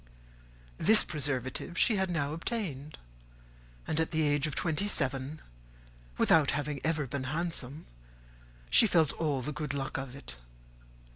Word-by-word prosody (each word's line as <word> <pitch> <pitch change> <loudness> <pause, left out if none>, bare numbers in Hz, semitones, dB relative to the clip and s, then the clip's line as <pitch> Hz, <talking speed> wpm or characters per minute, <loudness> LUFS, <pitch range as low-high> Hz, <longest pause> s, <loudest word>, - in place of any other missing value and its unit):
This 215 +1 +7
preservative 140 +2 -3
she 220 - +3
had 190 -1 0
now 155 -4 -1
obtained; 160 - -4 0.9
and 155 - -1
at 160 - 0
the 160 -1 0
age 145 0 +2
of 150 - -5
twenty 170 +4 0
seven, 135 -3 0 0.8
without 155 -4 +4
having 145 -1 -3
ever 155 -2 0
been 130 +1 -4
handsome, 155 -1 -4 0.9
she 225 - +7
felt 160 -6 +3
all 145 -5 -1
the 150 - -4
good 145 0 -4
luck 135 -1 -3
of 135 -1 -7
it. - - -10
150 Hz, 140 wpm, -30 LUFS, 135-165 Hz, 0.9 s, This